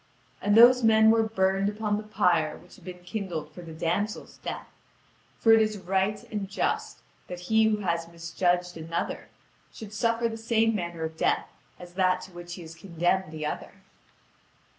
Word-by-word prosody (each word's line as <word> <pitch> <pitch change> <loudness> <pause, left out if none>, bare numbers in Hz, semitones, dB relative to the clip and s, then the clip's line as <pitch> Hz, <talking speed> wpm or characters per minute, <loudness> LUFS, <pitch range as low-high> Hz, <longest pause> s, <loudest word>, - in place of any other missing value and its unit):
And 205 +1 +3
those 250 +2 +8
men 220 -1 +6
were 225 0 +4
burned 195 -2 +1
upon 210 0 -1
the - - -4
pyre 175 -7 +1
which 180 - -17
had - - -19
been 180 -1 -9
kindled 180 -5 -5
for 180 - -10
the 165 -1 -10
damsel's 175 +7 -2
death; - - -5 0.7
for 225 - +5
it 225 - +6
is 215 -1 0
right 190 +3 -1
and 205 -3 -3
just 200 - -2 0.3
that 180 0 -7
he 220 +4 +3
who 215 -1 +1
has 170 -3 -1
misjudged 175 +1 -1
another, 165 +1 -4 0.4
should 215 -2 -10
suffer 230 +1 +1
the 225 -1 -5
same 225 0 +2
manner 170 -4 -4
of 160 0 -5
death - - +1 0.3
as 175 0 -11
that 185 0 +2
to 190 - -11
which 175 0 -8
he 175 - -9
had 165 0 -10
condemned 175 0 -1
the 155 -1 -5
other. 150 - -5
190 Hz, 180 wpm, -27 LUFS, 175-220 Hz, 0.7 s, those